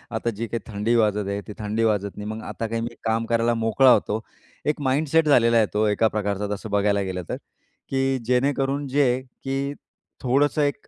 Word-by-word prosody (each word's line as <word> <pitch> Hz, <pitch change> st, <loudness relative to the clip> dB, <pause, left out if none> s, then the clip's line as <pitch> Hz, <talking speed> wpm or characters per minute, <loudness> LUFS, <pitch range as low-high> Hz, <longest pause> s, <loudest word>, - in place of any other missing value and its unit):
आता 120 Hz, -, -1 dB
जी 115 Hz, +2 st, -3 dB
काही 115 Hz, +2 st, -3 dB
थंडी 105 Hz, +4 st, 0 dB
वाजत 105 Hz, -3 st, +2 dB
आहे, 100 Hz, 0 st, -2 dB
ती 105 Hz, -, -6 dB
थंडी 105 Hz, +2 st, -1 dB
वाजत 100 Hz, -2 st, 0 dB
नाही, 105 Hz, 0 st, -5 dB
मग 110 Hz, 0 st, -5 dB
आता 115 Hz, -, -4 dB
काही 115 Hz, +1 st, -2 dB
मी 115 Hz, 0 st, -5 dB
काम 115 Hz, 0 st, 0 dB
करायला 115 Hz, 0 st, +2 dB
मोकळा 115 Hz, +3 st, +4 dB
होतो. 110 Hz, -2 st, +2 dB, 0.5 s
एक 150 Hz, -1 st, 0 dB
माइंडसेट 150 Hz, +4 st, +2 dB
झालेला 115 Hz, -4 st, +5 dB
आहे. 110 Hz, -, +5 dB
तो 105 Hz, +1 st, +2 dB
एका 110 Hz, +2 st, +3 dB
प्रकारचा 105 Hz, -1 st, -2 dB
तसं 110 Hz, +2 st, -8 dB
बघायला 100 Hz, 0 st, +2 dB
गेलं 95 Hz, -2 st, -3 dB
तर, -, -, -1 dB, 0.5 s
की 135 Hz, 0 st, +1 dB
जेणेकरून 135 Hz, +2 st, +1 dB
जे 130 Hz, -2 st, +2 dB, 0.2 s
की, 135 Hz, +1 st, -2 dB, 0.5 s
थोडंसं 140 Hz, +3 st, +2 dB
एक 145 Hz, -1 st, -1 dB
115 Hz, 195 wpm, -24 LUFS, 105-135 Hz, 0.5 s, झालेला